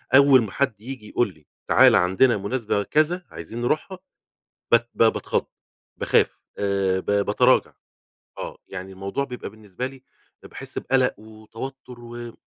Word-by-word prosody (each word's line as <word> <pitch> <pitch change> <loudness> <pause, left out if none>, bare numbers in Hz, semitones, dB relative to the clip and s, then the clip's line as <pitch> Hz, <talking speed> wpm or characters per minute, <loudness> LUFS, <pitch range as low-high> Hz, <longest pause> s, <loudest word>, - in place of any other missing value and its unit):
أوّل 135 -2 +7
ما 100 - -6
حد 130 -7 -1
ييجي 120 -3 -8
يقول 120 -6 0
لي 75 -3 -24 0.2
تعالَ - - +6
عندنا 95 +7 +4
مناسبة 105 0 -1
كذا 165 - +1
عايزين 110 +9 -7
نروحها 155 +9 -1 0.7
ب 120 - +10 0.2
ب - - +2
باتخض، 115 - +1 0.5
باخاف - - +1 0.2
آه، 100 -2 +1
ب - - -17 0.2
باتراجع - - +3 0.7
آه، - - -6
يعني 95 +1 -7
الموضوع 100 +8 -3
بيبقى 125 -3 -6
بالنسبة 110 +2 -7
لي 135 -1 -14 0.4
باحس - - -10
بقلق 130 -4 +1
وتوتّر 115 +4 -10
و 120 0 -10
آآ، 120 -1 -7
115 Hz, 145 wpm, -24 LUFS, 100-130 Hz, 0.7 s, ب